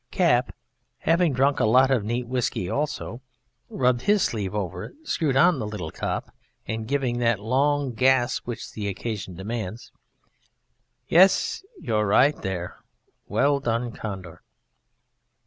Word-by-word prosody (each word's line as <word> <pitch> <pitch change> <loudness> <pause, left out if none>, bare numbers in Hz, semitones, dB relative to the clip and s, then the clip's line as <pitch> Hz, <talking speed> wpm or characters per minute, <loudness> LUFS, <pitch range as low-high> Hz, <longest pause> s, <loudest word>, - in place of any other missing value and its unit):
Cap 150 -10 +2 0.5
(_having 165 0 +3
drunk 135 +2 +2
a - - +3
lot 130 +5 +5
of 125 -6 +2
neat 120 +3 -2
whisky 125 -7 -1
also, 140 0 -3 0.5
rubbed 125 -2 +1
his 205 +5 +3
sleeve 105 -3 -2
over 90 -3 -3
it, - - -11
screwed 155 - 0
on 160 +2 +5
the 110 - -3
little 100 -7 -5
top - - -4 0.3
and 110 0 -4
giving 130 -3 0
that 115 -3 +2
long 135 +4 +1
gasp 130 0 +2
which 120 -3 -6
the 105 -2 -4
occasion 100 -2 -4
demands_): 110 +2 -5 1.2
Yes, 190 - +4 0.2
you're 105 - 0
right 135 +8 +4
there 90 -2 -5 0.5
"Well 140 0 +2
done. 120 -2 -1
Condor." 95 -7 -7
120 Hz, 135 wpm, -25 LUFS, 105-140 Hz, 1.2 s, lot